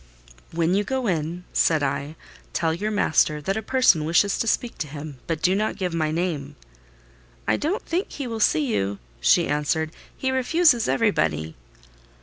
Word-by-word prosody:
"When 165 +1 +1
you 200 +2 +2
go 260 +2 -2
in," 170 -2 -2
said 160 -3 +3
I, 140 +2 -2 0.4
"tell 165 -1 +1
your 205 +6 -2
master 155 -7 +2
that 190 +7 -2
a 220 - -2
person 220 -9 +3
wishes 175 +6 +2
to 230 - -1
speak 235 +2 -1
to 155 - -2
him, 145 -1 -8
but 160 -2 -3
do 185 - +4
not 215 +2 0
give 180 -3 -2
my 160 -2 0
name." 160 -3 -2 0.9
"I - - +3
don't 365 +11 -2
think 355 +4 -1
he 280 - -4
will 230 -2 -4
see 295 +7 +3
you," 100 - -1 0.2
she - - +4
answered; 150 +2 0 0.3
"he 265 - -1
refuses 260 -1 +3
everybody." 80 - +1
175 Hz, 170 wpm, -24 LUFS, 155-230 Hz, 0.9 s, do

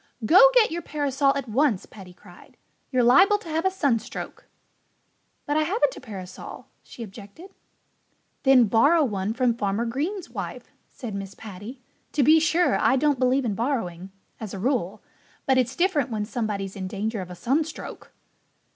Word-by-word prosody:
"Go 375 - +8
get 455 -6 +5
your 340 +1 -3
parasol 285 -3 0
at 275 - -4
once!" 230 -3 +1
Paddy 190 -3 -13
cried. 175 0 -18 0.3
"You're 255 -2 +2
liable 375 - +6
to 380 -5 -12
have 320 +2 -1
a - - +5
sunstroke." 285 - -3 1.0
"But 290 +1 0
I - - +3
haven't 415 +10 +1
a - - -10
parasol," 195 -7 -9 0.2
she 235 - -10
objected. 215 - -12 0.9
"Then 265 -3 +6
borrow 285 - +4
one 205 -5 -2
from 250 -1 +2
Farmer 210 0 -1
Green's 320 - -3
wife," - - -7 0.2
said 235 -6 -8
Mrs. 195 0 -7
Paddy. 220 +5 -10 0.3
"To 290 - +2
be 315 +5 +6
sure, 335 +2 +2
I 265 - +3
don't 285 0 +1
believe 255 +1 +2
in 220 - -1
borrowing 195 -7 -3 0.3
as 215 -3 -6
a - - -6
rule. 215 -4 -1 0.4
But 265 -1 +3
it's 255 +1 -1
different 345 -5 +1
when 215 -3 -2
somebody's 210 -4 -4
in 190 -2 -5
danger 210 +2 -3
of 180 - -8
a 180 - -8
sunstroke." 295 - -3
250 Hz, 165 wpm, -25 LUFS, 205-300 Hz, 1.0 s, Go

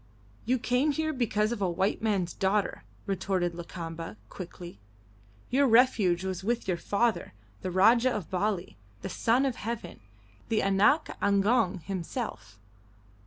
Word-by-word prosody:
"You 255 +3 +2
came 255 +4 +1
here 315 +1 -1
because 215 -4 0
of 240 - -3
the 195 - +1
white 190 +4 0
man's 195 -6 0
daughter," 195 +1 0 0.2
retorted 185 -2 -1
Lakamba, 165 -4 -7
quickly. 175 - -9 0.7
"Your 275 +2 +4
refuge 220 -7 +4
was 190 0 -3
with 235 +2 -1
your 185 - +1
father, 210 +6 0 0.3
the - - -3
Rajah 225 +7 +5
of 205 -9 -4
Bali, 190 -1 -1 0.3
the - - -3
Son 245 +4 +2
of 260 -3 -1
Heaven, 220 -5 -5 0.5
the 220 - +1
'Anak 195 +11 +3
Agong' 200 -1 +2
himself. 185 - -5
200 Hz, 135 wpm, -29 LUFS, 180-235 Hz, 0.7 s, Rajah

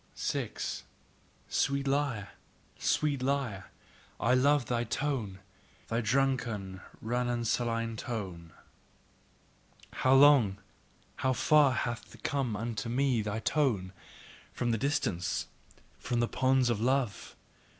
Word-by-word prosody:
6. - - -3 0.6
Sweet 140 0 0
lyre! 135 -8 0 0.5
Sweet 145 -3 +1
lyre! 130 -7 -1 0.5
I 120 +3 +2
love 140 +1 +4
thy 120 0 0
tone, 120 -5 -2 0.5
thy 115 +1 0
drunken, 115 -6 0 0.2
ranunculine 115 -1 -1
tone! 95 -9 -5 1.4
how 130 +1 +3
long, 135 -8 +6 0.6
how 130 0 +1
far 145 +1 +4
hath 120 0 -3
come 135 -7 -1
unto 115 +1 -3
me 130 -1 +1
thy 105 +1 -3
tone, 110 -11 0 0.6
from 120 -1 -1
the 115 - 0
distance, 105 - -1 0.5
from 120 -2 -1
the 120 - +2
ponds 130 -1 +2
of 110 -2 -1
love! 125 -3 0
120 Hz, 105 wpm, -30 LUFS, 110-135 Hz, 1.4 s, long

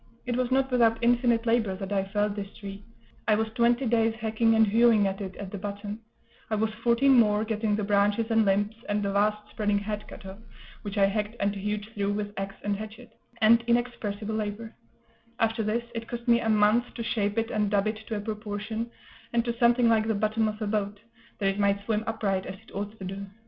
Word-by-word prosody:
It 245 -1 -1
was 250 -1 0
not 265 0 +1
without 230 -2 +4
infinite 240 -1 +3
labor 225 -4 +2
that 195 +1 -5
I 195 -1 +1
felled 205 +1 -1
this 200 -1 -5
tree; 200 0 -8 0.4
I 215 - +5
was 220 +1 0
twenty 240 +3 +2
days 225 -1 +2
hacking 225 0 +1
and 220 0 +6
hewing 225 0 +4
at 195 +1 -2
it 190 -1 -5
at 200 -2 -7
the 200 - -5
bottom; 205 +1 -5 0.5
I 220 - 0
was 220 +1 0
fourteen 250 +2 +5
more 210 -1 +3
getting 220 -1 0
the 210 - -2
branches 205 +3 +2
and 225 0 +4
limbs 205 +1 +1 0.2
and 205 0 0
the 200 - 0
vast 210 +1 +1
spreading 210 -1 0
head 210 +1 -4
cut - - -11
off, 190 +1 -9 0.4
which 205 -1 -6
I 200 - +5
hacked 210 +2 -1
and 200 0 +1
hewed 210 +1 -3
through 205 -1 -1
with 205 0 -3
axe 195 0 -4
and 205 0 0
hatchet, 215 +3 -9 0.3
and 230 +2 +6
inexpressible 220 -3 -1
labor; 215 +1 -4 0.7
after 225 0 +1
this, 220 +2 0
it 230 -1 -5
cost 240 0 -6
me 235 -1 +5
a 225 - -1
month 215 +3 +3
to 235 - -4
shape 205 -2 -1
it 225 0 0
and 210 -1 +1
dub 200 0 +2
it 215 0 -1
to 225 - -3
a 205 - -3
proportion, 215 +1 -4 0.4
and 235 0 +2
to 235 -1 -1
something 240 0 +4
like 220 -1 +3
the 220 - +1
bottom 215 +2 +1
of 215 0 -4
a - - -1
boat, 205 -1 -2 0.4
that 195 -2 +1
it 195 +1 -2
might 200 0 +1
swim 220 -1 0
upright 195 -4 -1
as 190 - -6
it - - -19
ought 205 +2 -5
to 190 - -7
do. 195 +2 -6
215 Hz, 220 wpm, -27 LUFS, 205-230 Hz, 0.7 s, and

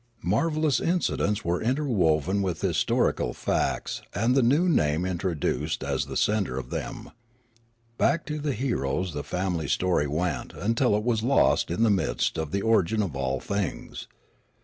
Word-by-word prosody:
Marvellous 150 - +1
incidents 165 - 0
were 85 +1 0
interwoven 100 - +1
with 90 -5 -2
historical - - +1
facts - - -1
and 115 +6 +2
the 135 - +4
new 145 +9 +3
name 80 - +2
introduced 90 -3 -2
as - - -1
the - - -4
centre 100 -11 +1
of 65 -1 -6
them. - - -5 0.9
Back 165 - +2
to 150 0 -4
the 145 -1 -1
heroes 95 - -1
the 75 - -4
family 90 -4 -2
story 85 0 +1
went 85 +5 -2
until 115 +1 +1
it 105 - -2
was 115 -2 +1
lost 130 +5 +3
in 90 +7 0
the 115 - +4
mists 95 -4 0
of 80 -2 -3
the 100 +5 -2
origin 110 -1 +2
of 90 -8 -4
all 65 0 -1
things. 100 +5 -4
100 Hz, 155 wpm, -26 LUFS, 80-120 Hz, 0.9 s, the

